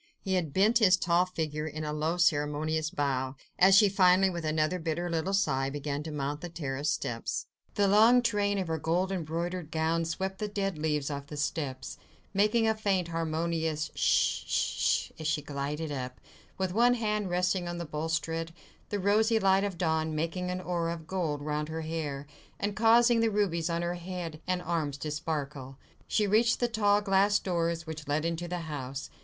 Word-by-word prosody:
He 190 Hz, -, -3 dB
had 175 Hz, -5 st, 0 dB
bent 210 Hz, -, +4 dB
his 185 Hz, -5 st, +6 dB
tall 175 Hz, +1 st, +2 dB
figure 155 Hz, -3 st, -3 dB
in 155 Hz, 0 st, -5 dB
a 150 Hz, 0 st, -3 dB
low 155 Hz, +3 st, -1 dB
ceremonious 155 Hz, -1 st, +1 dB
bow, 135 Hz, -5 st, -1 dB, 0.2 s
as 190 Hz, +1 st, +7 dB
she 205 Hz, +1 st, +7 dB
finally, 190 Hz, -1 st, +4 dB
with 170 Hz, -2 st, -5 dB
another 155 Hz, +3 st, 0 dB
bitter 170 Hz, +1 st, -2 dB
little 165 Hz, +3 st, -1 dB
sigh, 135 Hz, -9 st, +1 dB
began 145 Hz, 0 st, -3 dB
to 155 Hz, +1 st, -6 dB
mount 145 Hz, 0 st, -3 dB
the 175 Hz, -, -5 dB
terrace 145 Hz, -3 st, -3 dB
steps. 115 Hz, -5 st, -2 dB, 0.3 s
The 200 Hz, -1 st, +3 dB
long 225 Hz, +5 st, +6 dB
train 205 Hz, -3 st, +1 dB
of 190 Hz, -2 st, -2 dB
her 160 Hz, -1 st, -2 dB
gold 175 Hz, +5 st, 0 dB
embroidered 170 Hz, -1 st, -3 dB
gown 165 Hz, +1 st, 0 dB
swept 190 Hz, +3 st, -3 dB
the 210 Hz, -, -2 dB
dead 195 Hz, -2 st, -2 dB
leaves 150 Hz, -2 st, -1 dB
off 140 Hz, 0 st, -5 dB
the 150 Hz, -1 st, -8 dB
steps, 145 Hz, -3 st, -3 dB, 0.3 s
making 215 Hz, +3 st, +3 dB
a 220 Hz, -, +3 dB
faint 195 Hz, -5 st, 0 dB
harmonious 160 Hz, -1 st, -1 dB
sh—sh—sh -, -, +1 dB
as 155 Hz, -, -3 dB
she 155 Hz, -1 st, 0 dB
glided 145 Hz, +2 st, -4 dB
up, 130 Hz, -2 st, -5 dB, 0.4 s
with 190 Hz, -1 st, -1 dB
one 240 Hz, +3 st, +4 dB
hand 210 Hz, -4 st, -1 dB
resting 180 Hz, 0 st, 0 dB
on 175 Hz, 0 st, -4 dB
the 170 Hz, -, -4 dB
balustrade, 165 Hz, +2 st, -3 dB, 0.3 s
the 205 Hz, -, -1 dB
rosy 215 Hz, +4 st, +3 dB
light 195 Hz, -2 st, +3 dB
of 200 Hz, -4 st, -3 dB
dawn 160 Hz, -2 st, 0 dB
making 170 Hz, +4 st, -2 dB
an 180 Hz, 0 st, -3 dB
aureole 170 Hz, -2 st, -1 dB
of 160 Hz, -2 st, -11 dB
gold 155 Hz, -5 st, -2 dB
round 150 Hz, 0 st, -2 dB
her 160 Hz, +1 st, -4 dB
hair, 155 Hz, -3 st, -4 dB, 0.3 s
and 205 Hz, 0 st, -2 dB
causing 230 Hz, +2 st, +5 dB
the 225 Hz, 0 st, +3 dB
rubies 180 Hz, -6 st, 0 dB
on 170 Hz, 0 st, -1 dB
her 175 Hz, 0 st, -1 dB
head 175 Hz, -3 st, -6 dB
and 180 Hz, -1 st, -1 dB
arms 155 Hz, -5 st, -2 dB
to 150 Hz, +2 st, -4 dB
sparkle. 145 Hz, -4 st, -4 dB, 0.3 s
She 210 Hz, -, +2 dB
reached 220 Hz, +3 st, +3 dB
the 240 Hz, -, +2 dB
tall 205 Hz, -3 st, +2 dB
glass 200 Hz, +1 st, +3 dB
doors 170 Hz, -2 st, -1 dB
which 155 Hz, -2 st, -7 dB
led 150 Hz, +2 st, 0 dB
into 170 Hz, +1 st, -2 dB
the 175 Hz, 0 st, -3 dB
house. 140 Hz, -3 st, -6 dB
170 Hz, 185 wpm, -29 LUFS, 155-190 Hz, 0.4 s, as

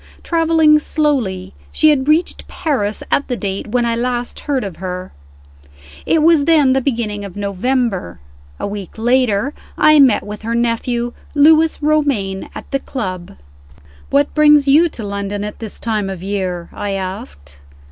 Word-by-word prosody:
Traveling 320 Hz, -2 st, +3 dB
slowly, 245 Hz, -, -1 dB, 0.2 s
she 310 Hz, -1 st, +4 dB
had 270 Hz, -2 st, 0 dB
reached 315 Hz, +3 st, +1 dB
Paris 220 Hz, -, -2 dB
at 280 Hz, -, +1 dB
the 245 Hz, -, -2 dB
date 195 Hz, -1 st, -4 dB
when 240 Hz, +2 st, 0 dB
I 230 Hz, 0 st, 0 dB
last 240 Hz, 0 st, -3 dB
heard 280 Hz, -3 st, -2 dB
of 195 Hz, -4 st, -6 dB
her. 185 Hz, 0 st, -6 dB, 1.0 s
It 320 Hz, -2 st, +3 dB
was 320 Hz, -3 st, +4 dB
then 295 Hz, -5 st, +4 dB
the 265 Hz, -, +1 dB
beginning 230 Hz, -6 st, -2 dB
of 195 Hz, -3 st, -8 dB
November. 200 Hz, -, -2 dB, 0.4 s
A -, -, -3 dB
week 200 Hz, -1 st, -7 dB
later, 245 Hz, +1 st, +1 dB, 0.2 s
I 305 Hz, -1 st, +5 dB
met 260 Hz, -6 st, +5 dB
with 210 Hz, 0 st, -7 dB
her 230 Hz, +1 st, -2 dB
nephew, 235 Hz, +1 st, -1 dB, 0.2 s
Lewis 315 Hz, +1 st, +4 dB
Romayne, 275 Hz, -11 st, 0 dB
at -, -, -9 dB
the 275 Hz, -, 0 dB
club. 185 Hz, -11 st, -6 dB, 0.7 s
"What 280 Hz, +1 st, +1 dB
brings 300 Hz, -2 st, +5 dB
you 315 Hz, +5 st, +5 dB
to 235 Hz, -, -8 dB
London 200 Hz, 0 st, -4 dB
at 210 Hz, 0 st, -6 dB
this 220 Hz, -3 st, -8 dB
time 215 Hz, -4 st, -2 dB
of 185 Hz, -2 st, -7 dB
year?" 185 Hz, -3 st, -3 dB
I 205 Hz, -1 st, -4 dB
asked. 75 Hz, -, -7 dB
235 Hz, 155 wpm, -17 LUFS, 200-290 Hz, 1.0 s, I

